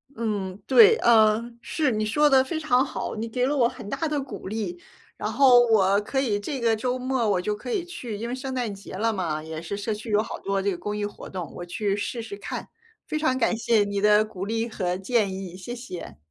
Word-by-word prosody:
嗯， 205 -5 -3
对。 455 -1 +7
呃， 225 0 +4
是， 295 -1 0
你 215 -1 0
说 295 +8 +3
得 265 -2 +6
非 315 +4 -3
常 260 -5 +3
好， 270 - -4
你 225 +1 -3
给 250 +2 0
了 285 +3 0
我 245 -4 +4
很 245 -5 -10
大 320 - -1
的 300 -1 -1
鼓 270 - -8
励， 195 -4 -4 0.4
然 210 - -3
后 250 +1 +7
我 200 -3 +4
可 265 +6 -2
以 215 -6 0
这 265 +7 -4
个 230 -1 +3
周 250 +3 -1
末 255 -3 0
我 185 -3 +2
就 210 +3 -1
可 245 +4 -7
以 350 - 0
去 250 -11 -6
因 220 +3 -4
为 - - -3
圣 260 +1 -4
诞 245 -5 -2
节 195 0 -11
了 225 +4 +1
嘛， 165 -6 -2
也 160 0 -6
是 170 +4 -4
社 205 +2 -2
区 220 +2 -7
有 210 0 +3
好 - - -7
多 195 0 -1
这 200 +1 0
个 180 - -4
公 210 +4 -4
益 210 0 -1
活 205 - -8
动， 180 -3 -6
我 175 - -6
去 200 +3 -1
试 220 +3 -3
试 220 -3 -7
看。 200 - -6 0.4
非 310 - -2
常 300 -4 +1
感 235 -2 +2
谢 230 -2 +3
你 200 0 -2
的 210 +1 +5
鼓 195 -3 -6
励 225 +2 -1
和 180 -5 -2
建 200 0 +1
议， 190 -2 -6
谢 185 +6 -7
谢。 180 - -8
220 Hz, 260 characters per minute, -25 LUFS, 200-250 Hz, 0.4 s, 对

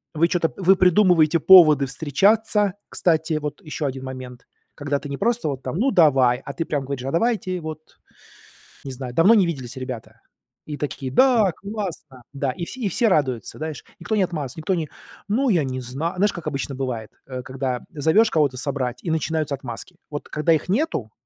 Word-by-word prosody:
Вы 165 +2 +3
чё-то 170 -3 0
вы 190 0 +4
придумываете 180 -4 +4
поводы 155 -6 +7
встречаться. 200 - +1
Кстати, 160 -1 0
вот 150 +3 -6
ещё 155 -3 -5
один 130 0 -5
момент. 130 -1 -9 0.3
Когда 145 0 -2
ты 145 - -9
не 140 - -4
просто 230 -6 0
вот 135 -2 -4
там: - - -4
"Ну 260 +7 +2
давай!", 135 - +4
А 140 - -6
ты 165 - -2
прям 140 -3 -2
говоришь: 135 -2 -5
"А 135 - -2
давайте 185 -1 0
вот!- 155 0 -9 0.9
Не 135 - -5
знаю,- 125 -1 -7
Давно 180 - +6
не 205 -5 +5
виделись, 130 -6 -5
ребята". 115 -3 -7 0.4
И 150 -1 -6
такие: 135 -3 -4
"Да, 230 - +4
классно", 190 - -7
да, 140 -1 -1
и 170 - -7
все 260 - -9
и 215 - 0
все 230 +6 +1
радуются, 135 - 0
знаешь, 155 -2 -6 0.2
никто 220 - -2
не 205 - +3
отмазывается, 150 -8 -4
никто 160 +4 -1
не: 160 -3 -3 0.4
"Ну, 250 +5 +1
я 170 -8 +3
не 130 -1 -4
знаю", 140 +9 -4
знаешь, 205 +2 +3
как 170 - -7
обычно 135 0 -3
бывает, 125 -5 -4 0.2
э, 130 -1 -5
когда 130 -1 -3
зовешь 160 +9 +3
кого-то 145 -5 +2
собрать, 130 -2 -3
и 165 - -2
начинаются 160 -2 -1
отмазки. 135 +7 -9
Вот 145 - -6
когда 155 +2 +2
их 160 +3 -1
нету- 205 - -1
155 Hz, 190 wpm, -22 LUFS, 130-185 Hz, 0.9 s, поводы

